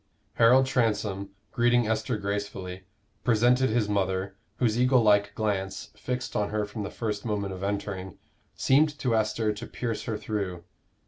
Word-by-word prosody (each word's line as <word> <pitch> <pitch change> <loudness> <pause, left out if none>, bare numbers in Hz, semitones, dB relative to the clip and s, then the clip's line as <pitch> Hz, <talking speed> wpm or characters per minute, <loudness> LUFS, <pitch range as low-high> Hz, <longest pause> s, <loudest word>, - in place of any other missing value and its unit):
Harold 125 +3 +6
Transome, 105 -6 0 0.2
greeting 120 -1 +3
Esther 110 +2 0
gracefully, 100 -2 -4 0.4
presented 125 +3 +3
his 110 -1 +1
mother, 95 -1 -1 0.2
whose 120 -2 +1
eagle 125 -1 +4
like 100 -1 +4
glance, 95 -3 -2
fixed 125 0 -4
on 105 -1 +1
her 105 0 -1
from 105 +1 -6
the 100 - -3
first 105 -3 -3
moment 100 -3 -2
of 95 - -8
entering, 100 -2 -3 0.4
seemed 150 +2 +3
to 125 -5 0
Esther 110 0 +1
to 105 +3 -8
pierce 115 -3 -4
her 110 -2 -2
through. 100 -5 -3
105 Hz, 150 wpm, -27 LUFS, 100-120 Hz, 0.4 s, Harold